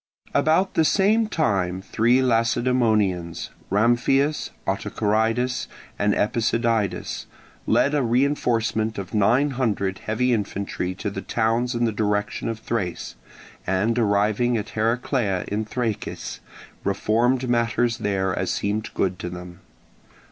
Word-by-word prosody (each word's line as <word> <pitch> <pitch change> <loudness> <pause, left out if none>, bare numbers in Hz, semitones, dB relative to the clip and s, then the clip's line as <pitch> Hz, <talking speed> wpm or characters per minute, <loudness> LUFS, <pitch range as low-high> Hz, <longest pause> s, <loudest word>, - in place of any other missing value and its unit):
About 165 +5 +2
the 160 - +3
same 210 +6 +3
time 95 - 0
three 120 +6 +2
Lacedaemonians—Ramphias, 115 - +1 0.2
Autocharidas, 110 +5 0 0.3
and 105 0 +2
Epicydidas—led 115 +4 -1
a 145 - +2
reinforcement 115 -3 +1
of 95 -2 -6
nine 120 +8 +3
hundred 105 -7 -1
heavy 125 +3 0
infantry 100 -3 -2
to 100 +2 -4
the 95 - -5
towns 120 +3 0
in 120 0 +1
the 115 - +1
direction 105 0 -1
of 115 - -3
Thrace, 95 -8 -3 0.5
and 105 +6 +1
arriving 110 +3 +2
at 105 - -4
Heraclea 110 -3 0
in 105 +2 -1
Trachis 115 -1 -4 0.4
reformed 120 +6 +1
matters 120 -1 +1
there 95 -2 0
as - - -2
seemed 105 +2 -1
good 95 -1 0
to 90 - -4
them. 90 0 -9
110 Hz, 110 wpm, -23 LUFS, 100-125 Hz, 0.5 s, the